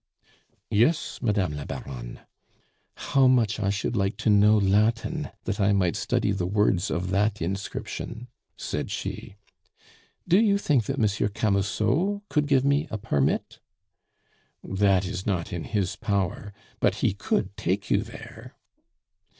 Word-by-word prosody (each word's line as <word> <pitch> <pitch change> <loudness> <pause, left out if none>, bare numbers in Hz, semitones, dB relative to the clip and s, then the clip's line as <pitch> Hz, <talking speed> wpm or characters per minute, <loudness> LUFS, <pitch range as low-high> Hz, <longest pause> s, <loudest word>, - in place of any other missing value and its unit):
"Yes, 125 +10 +2
Madame 100 - +1
la 75 - -5
Baronne." - - -7 0.7
"How 135 -2 +2
much 120 -5 +3
I 100 -2 0
should 100 +4 -1
like 95 0 0
to 110 - +1
know 105 +1 +5
Latin 110 +10 +1
that 100 0 -3
I 100 0 +3
might 90 -3 +1
study - - 0
the 95 -3 -1
words 100 -1 +1
of 90 +1 -2
that 105 +2 +1
inscription!" 100 +6 -5 0.3
said - - -4
she. - - -5 0.9
"Do 180 +3 +5
you 210 -3 +4
think 145 - +1
that 135 - -3
Monsieur 105 -4 +1
Camusot 110 - 0
could 150 -1 +1
give 135 -2 +3
me 140 +3 +2
a 110 - -3
permit?" 70 -8 -1 1.0
"That 95 -1 +2
is 95 +1 -5
not 90 -5 -1
in 85 - -4
his 100 -4 -1
power; 100 -2 -2 0.3
but - - +2
he - - +3
could - - -1
take - - -2
you - - +4
there." - - -11
105 Hz, 140 wpm, -26 LUFS, 95-120 Hz, 1.0 s, know